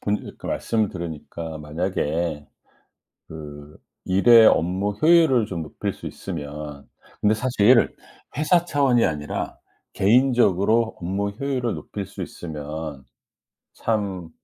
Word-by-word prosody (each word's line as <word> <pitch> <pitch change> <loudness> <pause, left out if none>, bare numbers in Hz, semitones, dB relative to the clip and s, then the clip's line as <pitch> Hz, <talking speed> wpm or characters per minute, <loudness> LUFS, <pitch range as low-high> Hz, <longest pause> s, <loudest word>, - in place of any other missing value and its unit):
본 105 0 -3
그 - - -10
말씀을 110 -2 0
들으니까 80 -1 -6
만약에 80 -1 -2 0.8
그 75 -1 -10 0.3
일의 110 +5 +6
업무 95 +4 +2
효율을 155 0 +4
좀 85 -6 -4
높일 75 - -4
수 - - -13
있으면 75 -4 -7 0.3
근데 105 +1 +4
사실 115 0 +3 0.4
회사 165 +3 +3
차원이 140 -7 +2
아니라 75 -4 -3 0.4
'개인적으로 115 -1 +3
업무 95 +3 -2
효율을 125 +1 -2
높일 100 -1 -6
수 - - -9
있으면 75 -3 -6 0.7
참' 100 -6 -2
95 Hz, 235 characters per minute, -23 LUFS, 80-115 Hz, 0.8 s, 일의